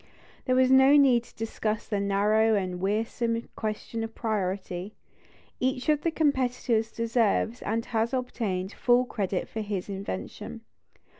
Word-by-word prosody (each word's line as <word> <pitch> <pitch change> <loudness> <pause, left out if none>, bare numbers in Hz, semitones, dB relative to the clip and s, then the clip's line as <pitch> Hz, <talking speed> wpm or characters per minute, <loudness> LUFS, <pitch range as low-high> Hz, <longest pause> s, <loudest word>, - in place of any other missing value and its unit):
There 255 -1 +3
is 260 0 +4
no 265 +2 +7
need 250 -4 +5
to - - -19
discuss 220 -1 -3
the 205 - -1
narrow 210 +3 +3
and 185 -3 -2
wearisome 230 +3 -1
question 220 +1 -4
of 225 0 -6
priority; 195 -3 -3 0.6
each 255 +2 -1
of 300 -1 +3
the 335 - +1
competitors 250 -7 +1
deserves, 230 0 0
and 225 +2 -2
has 225 -1 0
obtained, 215 -7 -2
full 245 0 +3
credit 195 -6 -2
for 220 - -5
his 205 -2 -4
invention. 195 - -6
225 Hz, 140 wpm, -27 LUFS, 205-250 Hz, 0.6 s, no